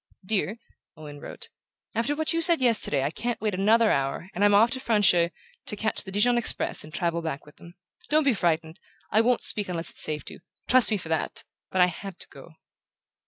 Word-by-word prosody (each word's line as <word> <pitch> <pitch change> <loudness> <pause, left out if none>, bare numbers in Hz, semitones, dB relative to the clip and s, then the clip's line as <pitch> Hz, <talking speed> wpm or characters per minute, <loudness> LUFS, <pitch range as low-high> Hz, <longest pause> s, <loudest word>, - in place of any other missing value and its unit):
"Dear," 210 +1 -1 0.4
Owen 150 -2 -10
wrote, - - -8 0.5
"after 235 +6 0
what 315 +2 -1
you 330 - 0
said 335 0 +5
yesterday 230 - +2
I 140 - -1
can't 235 +6 -4
wait 215 -2 -2
another 215 +4 +3
hour, 135 +7 -2
and 195 - -1
I'm 205 0 +5
off 225 +4 +5
to 260 - -3
Francheuil, 205 -8 +3 0.4
to 220 - 0
catch 220 +1 -1
the 190 - -10
Dijon 240 +5 +3
express 235 - +1
and 155 - -12
travel 170 0 -2
back 160 -3 -5
with 150 - -18
them. 170 +1 -15 0.3
Don't 310 +1 +3
be 275 -3 +3
frightened; 165 -4 -1 0.3
I 215 - +4
won't 245 +1 +1
speak 205 -3 +1
unless 170 -2 -3
it's - - -2
safe 150 -3 -2
to. - - -10 0.3
Trust 255 -1 +6
me 215 - 0
for 170 -4 -9
that 160 -2 -2 0.3
but 185 - 0
I - - +8
had 185 +1 -7
to - - -7
go." 160 - -15
200 Hz, 210 wpm, -26 LUFS, 170-230 Hz, 0.5 s, I